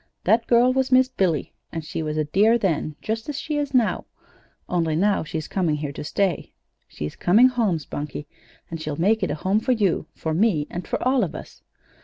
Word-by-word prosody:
That 225 +4 +2
girl 245 +1 +4
was 265 0 0
Miss 255 0 +5
Billy, 180 - -1 0.2
and 165 -2 -5
she 160 - -4
was 155 -1 -3
a 155 - +2
dear 210 +10 +3
then, 160 -7 -1
just 225 +4 -3
as 290 - -3
she 305 -2 -3
is 290 -1 -2
now, 245 -5 +1 0.6
only 165 -3 0
now 200 +3 +2
she's 155 0 -5
coming 175 -6 0
here 150 -1 -4
to 140 - -7
stay. 185 +3 -1 0.3
She's 75 0 -6
coming 220 +9 +5
home, 225 -9 +1
Spunkie; 150 0 -6 0.5
and 165 -1 -5
she'll 150 -2 -3
make 210 +8 +2
it 185 - 0
a 145 - -1
home 190 +6 +1
for 255 +3 +1
you, 205 -7 0
for 160 - -3
me, 170 -4 +2
and 175 - -5
for - - -1
all 260 -2 +3
of 170 - -4
us. - - -10
190 Hz, 210 wpm, -23 LUFS, 155-230 Hz, 0.6 s, Miss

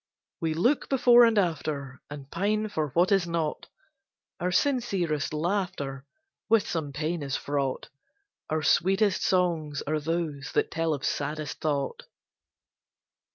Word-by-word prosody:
We 160 -1 -1
look 245 - +1
before 245 -3 +7
and 230 -2 +2
after, 150 -7 -1
And 140 -2 -9
pine 215 +4 0
for 155 -7 -1
what 175 +3 +4
is 195 -3 +3
not: 165 -3 -2 0.7
Our 180 0 -1
sincerest 190 - 0
laughter 155 -5 -2 0.4
With 225 -2 +4
some 155 -4 -3
pain 155 +4 -2
is 140 -1 -2
fraught; 140 -2 -2 0.6
Our 155 0 -1
sweetest 195 +6 +3
songs 165 -6 0
are 155 +1 0
those 155 -3 -3
that - - +1
tell 165 -1 0
of 140 - -6
saddest 150 +1 -3
thought. 140 -3 -1
165 Hz, 130 wpm, -27 LUFS, 145-190 Hz, 0.7 s, before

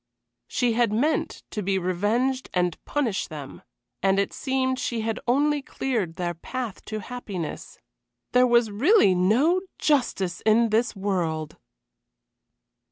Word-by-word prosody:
She 245 -2 +1
had 235 -2 +2
meant 275 +9 0
to 210 - -3
be 195 0 0
revenged 215 +9 0
and 180 -2 0
punish 255 -9 -1
them, 145 -4 -9 0.4
and 195 0 +3
it 200 - 0
seemed 260 -1 -1
she 235 -2 -2
had 225 +1 -2
only 290 +4 +2
cleared 225 -12 -2
their 175 0 -2
path 235 +5 -6
to 215 -1 -4
happiness. 200 -8 -6 0.5
There 250 0 +5
was 235 -2 +3
really 270 - +5
no 245 - +3 0.2
justice 240 - 0
in 225 +1 +4
this 225 +2 +1
world! 170 -6 -2
220 Hz, 130 wpm, -25 LUFS, 190-255 Hz, 0.5 s, There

